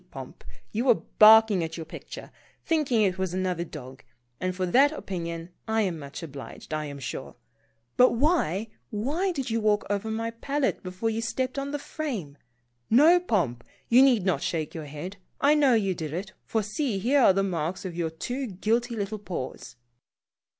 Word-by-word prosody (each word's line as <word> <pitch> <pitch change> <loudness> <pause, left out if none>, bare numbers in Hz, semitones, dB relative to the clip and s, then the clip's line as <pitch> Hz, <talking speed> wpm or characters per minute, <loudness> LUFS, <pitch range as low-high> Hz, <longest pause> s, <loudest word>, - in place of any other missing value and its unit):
Pomp, - - -10 0.3
you 230 +4 -1
were 245 -3 +6 0.2
barking 215 -3 +8
at 160 0 -5
your 165 - -6
picture, - - -9 0.3
thinking 285 -9 +2
it 190 -2 0
was 185 -1 -1
another 185 -2 -1
dog, 130 -5 -10 0.4
and 185 0 -2
for 185 0 -1
that 265 +11 +5
opinion 170 - -5 0.2
I 220 0 +2
am 175 -5 -2
much 140 +2 -8
obliged, 140 0 -9
I 155 0 -1
am 140 -1 -7
sure. 130 0 -6 0.6
But 250 - +6
why, 230 - +1 0.2
why 285 - -1
did 270 -8 -3
you 225 0 0
walk 210 -1 +2
over 205 +2 -1
my 225 +1 -2
palette 275 +4 -1
before 185 +5 -2
you 225 +1 -2
stepped 255 +4 -2
on 275 0 -3
the 290 - -2
frame? 225 - -5 0.5
No, 310 +9 +7
Pomp, 170 - -1 0.3
you 245 +2 +7
need 245 -8 +4
not 175 -7 +1
shake 160 -3 -2
your 160 -2 -6
head. 150 +7 -7 0.2
I 285 +1 +5
know 285 -5 +4
you 195 -4 +1
did 155 -3 -5
it, 190 +3 -5
for 220 -1 0
see, 215 +2 -2
here 250 +9 +2
are 195 - +6
the 195 +1 +1
marks 175 -1 -2
of 180 -3 -5
your 170 -2 -1
two 250 +12 -4
guilty 230 +5 -1
little 210 0 -3
paws 130 -9 -6
205 Hz, 185 wpm, -27 LUFS, 170-245 Hz, 0.6 s, barking